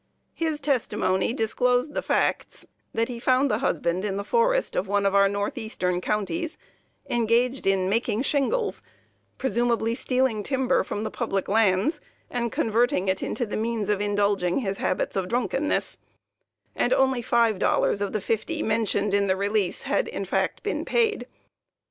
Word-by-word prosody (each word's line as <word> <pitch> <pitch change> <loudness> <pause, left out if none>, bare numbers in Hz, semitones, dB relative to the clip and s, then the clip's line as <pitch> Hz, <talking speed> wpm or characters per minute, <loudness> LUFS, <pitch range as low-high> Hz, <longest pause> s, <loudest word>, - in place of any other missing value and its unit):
His 320 -2 -2
testimony 225 -9 0
disclosed 250 +3 +1
the - - -1
facts - - -1 0.3
that 230 0 0
he 240 -2 -6
found 260 +2 +2
the - - +1
husband 170 +3 0
in 200 -2 -2
the 200 - -2
forest - - +1
in - - +1
one 205 0 0
of 195 - +2
our 200 0 +5
north 200 0 -2
eastern 180 -5 -2
counties, 300 - -2 0.5
engaged 240 0 +1
in 190 -1 +2
making 225 +3 0
shingles, 420 - 0 0.6
(presumably 235 -3 0
stealing 255 -3 0
timber 265 +3 +1
from 205 - -4
the 220 - -3
public 195 -5 -2
lands 215 - +2 0.3
and 235 -2 -1
converting 225 -3 +1
it 190 - 0
into 245 - -2
the 210 - -5
means 220 -2 -2
of 205 -1 +1
indulging 205 -3 +1
his 195 -4 -2
habits 185 - -1
of 190 -2 -1
drunkenness,) 250 +6 -1 0.8
and - - +2
only 265 - +2
five 230 -3 +2
dollars 200 - +2
of 200 - -1
the 215 - -2
fifty 230 +11 -2
mentioned 210 -2 0
in 200 0 +2
the 190 - +2
release 200 -1 0
had - - 0
in - - -4
fact - - -1
been - - -2
paid. 440 - 0
225 Hz, 160 wpm, -25 LUFS, 200-255 Hz, 0.8 s, our